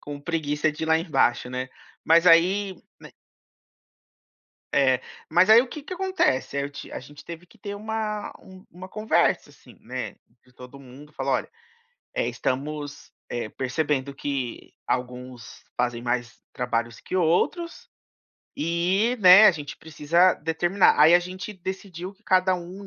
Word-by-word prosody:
Com 145 -1 -8
preguiça 155 -1 -1
de 150 - -8
ir - - -5
lá 160 0 +4
embaixo, 135 -7 +1
né, 130 0 -4 0.4
mas 165 +2 +5
aí 185 +3 +4 0.2
n - - -13 1.6
É, 130 -2 +3 0.3
mas 180 +3 +4
aí 225 +2 +8
o - - -7
que 300 - -8
que 370 - -7
acontece? 375 - 0
Eh, - - +1
aí 140 - -2
eu - - -10
ti 140 - -10
a - - -5
gente 145 +3 -14
teve 170 +1 -9
que 230 - -22
ter 205 -1 -7
uma 215 0 -4
um 185 0 -16
uma 180 +2 -10
conversa, 215 +2 +1
assim, - - -19
né, - - -6 0.3
de 125 - -25
todo 125 +2 -13
mundo, 140 +3 -14
falar: 135 -1 -2
"Olha, - - -1 0.6
eh, - - 0
estamos, 145 +2 -4 0.2
eh, 120 -2 -4
percebendo 140 0 -2
que 135 -4 -5
alguns 125 -2 -5
fazem 120 -1 -1
mais 120 -1 -3
trabalhos 115 -2 -2
que - - -8
outros 185 - 0 0.7
e, 180 +9 +1
né, 190 +2 +9
a - - +8
gente 150 -5 -7
precisa 165 +4 +2
determinar", 175 +5 +2
aí 160 +3 +8
a - - +8
gente 185 +3 -7
decidiu 190 -1 -7
que 200 +2 -31
cada 185 -2 +3
um 180 +3 -8
165 Hz, 160 wpm, -25 LUFS, 135-190 Hz, 1.6 s, né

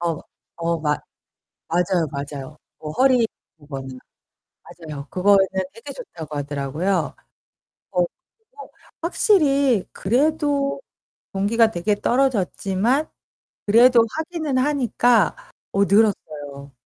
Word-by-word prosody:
어. 170 -3 -1 0.4
어 170 0 -1
맞 150 -1 0 0.7
맞아요 175 -1 +1
맞아요. 140 0 -6 0.2
뭐 155 -1 -6
허리 250 +1 +3 0.3
그거는. 135 -3 -8 0.7
맞아요. 155 -4 -9
그거는 195 +1 +4 0.3
되게 230 +5 -9
좋다고 160 - -9
하더라고요. 145 +5 -2 0.8
어, 180 - +2 0.4
그리고 445 -1 -14 0.3
확실히 280 - +3
그래도 285 - +1 0.5
동기가 220 +3 +3
되게 205 +3 0
떨어졌지만 240 - +1 0.6
그래도 235 +2 +6
하기는 315 -4 -2
하니까 255 -3 +2 0.4
어, 200 0 +3
늘었어요. 150 -10 0
200 Hz, 230 characters per minute, -22 LUFS, 155-265 Hz, 0.8 s, 그래도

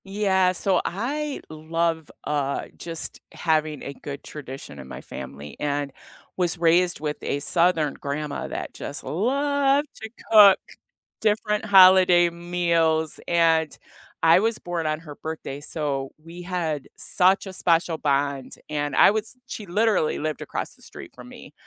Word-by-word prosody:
Yeah, 195 -2 +2
so 185 0 +1
I 280 +9 -3
love, 160 0 -2
uh, 140 -2 -1
just 165 -1 -5
having 155 -3 0
a - - -6
good 140 0 -8
tradition 135 - -9
in 65 - -10
my - - -8
family 70 +1 -9
and 145 -1 -2 0.5
was 175 -2 0
raised 175 +2 +3
with 150 0 -3
a 140 - -2
southern 165 -1 +2
grandma 145 +1 -4
that - - -6
just 145 - -6
loved 280 - +1
to 220 - -6 0.2
cook 205 -3 +9 0.6
different 210 -1 +1
holiday 185 -3 +7
meals, 170 -2 0
and 165 -2 +2 0.4
I 165 +3 +6
was 225 +1 0
born 175 -2 -4
on 155 0 -1
her 150 -3 -10
birthday, 155 -3 -6
so 140 -3 -2
we 165 +2 -10
had 170 -5 -3
such 190 +3 +2
a 190 - -7
special 170 -2 +1
bond, 140 -2 -1
and 145 -1 -2
I - - +7
was 220 +3 -3
she 220 -4 -6
literally 205 -3 +1
lived 155 -1 -3
across - - -5
the - - -21
street - - -11
from - - -12
me, - - -13
165 Hz, 145 wpm, -24 LUFS, 150-190 Hz, 0.6 s, cook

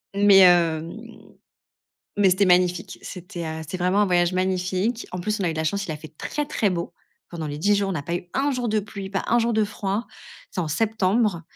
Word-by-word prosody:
mais, 200 -1 +6
hem, 175 +5 +2 0.9
mais 200 -2 +4
c'était 185 +2 +3
magnifique, 180 0 +2
c'était, 175 -2 -7
heu, 160 0 -5
c'était 160 +4 -6
vraiment 185 +3 +1
un 205 - +2
voyage 175 -1 +2
magnifique. 185 +5 -1
En 180 - -5
plus, 210 +3 -2
on - - 0
a 175 - +1
eu - - -2
de 160 - -6
la 160 - -1
chance, 200 +5 -1
il - - -5
a - - -5
fait 155 +1 -13
très, 295 - -3
très 210 -8 0
beau. 170 -1 -3 0.4
Pendant 165 -3 -5
les 145 0 -5
10 205 +6 +3
jours, 200 -1 0
on - - -1
n'a 155 - -3
pas 170 +4 -3
eu 175 0 -5
un 280 +2 +1
jour 245 -3 -2
de 215 - +2
pluie, 200 -1 -8
pas 195 - -1
un 240 - +3
jour 235 0 +1
de 220 -1 +2
froid. 205 +1 -3 0.4
C'est 185 - -3
en 155 - -4
septembre. 210 0 +1
185 Hz, 240 wpm, -24 LUFS, 175-210 Hz, 0.9 s, mais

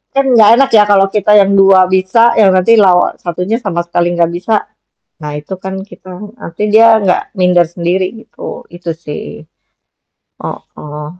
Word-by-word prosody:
kan 275 0 +1
gak 215 -2 +5
enak 270 0 +2
ya 210 -1 +6
kalau 195 -1 +4
kita 210 0 0
yang 200 -1 +3
2 190 -1 +5
bisa 190 +6 +2
yang 200 -3 +5
nanti 205 +5 +3
lawan 180 -2 +2
1-nya 180 +7 -3
sama 170 -5 -3
sekali 175 0 -2
gak 170 0 0
bisa, 180 +6 -4 0.7
nah 150 -1 -7
itu 155 +6 -8
kan 190 0 -7
kita 185 -2 -15 0.3
nanti 170 +5 -8
dia 225 +2 +5 0.2
gak 190 +2 -2
minder 180 -2 +2
sendiri 175 +2 -2 0.2
gitu, - - -10
itu 175 -1 -8
sih. 155 -2 -9 1.0
Heeh. 150 0 -9
185 Hz, 160 wpm, -12 LUFS, 175-205 Hz, 1.0 s, ya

